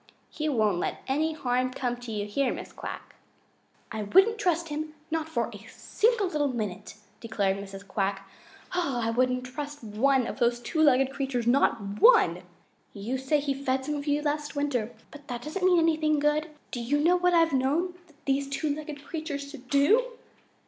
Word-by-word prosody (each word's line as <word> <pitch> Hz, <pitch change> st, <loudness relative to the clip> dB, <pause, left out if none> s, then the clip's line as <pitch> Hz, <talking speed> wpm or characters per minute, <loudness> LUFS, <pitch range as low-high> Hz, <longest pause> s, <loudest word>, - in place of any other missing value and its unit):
He 310 Hz, 0 st, -2 dB
won't 215 Hz, -9 st, +2 dB
let -, -, -3 dB
any 310 Hz, +4 st, +1 dB
harm 255 Hz, -3 st, 0 dB
come 250 Hz, -2 st, -2 dB
to 245 Hz, -1 st, -8 dB
you 205 Hz, -1 st, -2 dB
here, 255 Hz, +5 st, 0 dB
Mrs. -, -, -7 dB
Quack." -, -, -7 dB, 0.8 s
"I 220 Hz, -1 st, -3 dB
wouldn't 385 Hz, -, +4 dB
trust 340 Hz, -3 st, 0 dB
him, 305 Hz, +1 st, -4 dB, 0.2 s
not 320 Hz, 0 st, -1 dB
for 320 Hz, -, 0 dB
one -, -, -10 dB
single 455 Hz, -1 st, +1 dB
little 300 Hz, -5 st, 0 dB
minute," 210 Hz, -7 st, -4 dB, 0.2 s
declared 205 Hz, -4 st, 0 dB
Mrs. 195 Hz, 0 st, -9 dB
Quack. 195 Hz, -1 st, -2 dB, 0.4 s
"I 265 Hz, -10 st, 0 dB
wouldn't 250 Hz, +1 st, +1 dB
trust 290 Hz, +2 st, -7 dB
one 250 Hz, +5 st, +2 dB
of -, -, -5 dB
those 240 Hz, 0 st, +2 dB
two 315 Hz, +6 st, -2 dB
legged 270 Hz, -3 st, +4 dB
creatures, 270 Hz, -4 st, -2 dB
not 230 Hz, -5 st, +1 dB
ONE. -, -, +6 dB, 0.5 s
You 225 Hz, +6 st, -3 dB
say 265 Hz, +3 st, +1 dB
he 280 Hz, -1 st, -1 dB
fed 265 Hz, -1 st, -1 dB
some 300 Hz, -, -2 dB
of 290 Hz, 0 st, -4 dB
you 295 Hz, +1 st, +1 dB
last 295 Hz, 0 st, -2 dB
winter, 260 Hz, -6 st, -1 dB, 0.2 s
but 290 Hz, -1 st, -13 dB
that 245 Hz, -3 st, -5 dB
doesn't 315 Hz, +5 st, -4 dB
mean 365 Hz, -1 st, +5 dB
anything 315 Hz, -2 st, +3 dB
good. 295 Hz, +2 st, +1 dB, 0.2 s
Do 245 Hz, -, -4 dB
you 260 Hz, +5 st, +1 dB
know 340 Hz, +4 st, +4 dB
what 360 Hz, 0 st, +3 dB
I've 330 Hz, -2 st, +4 dB
known 290 Hz, +8 st, +1 dB, 0.3 s
these 275 Hz, 0 st, 0 dB
two 290 Hz, +1 st, -1 dB
legged 300 Hz, -1 st, -8 dB
creatures 295 Hz, -4 st, -5 dB
to 290 Hz, -, -9 dB
do?" 290 Hz, -, +2 dB
280 Hz, 180 wpm, -28 LUFS, 245-310 Hz, 0.8 s, ONE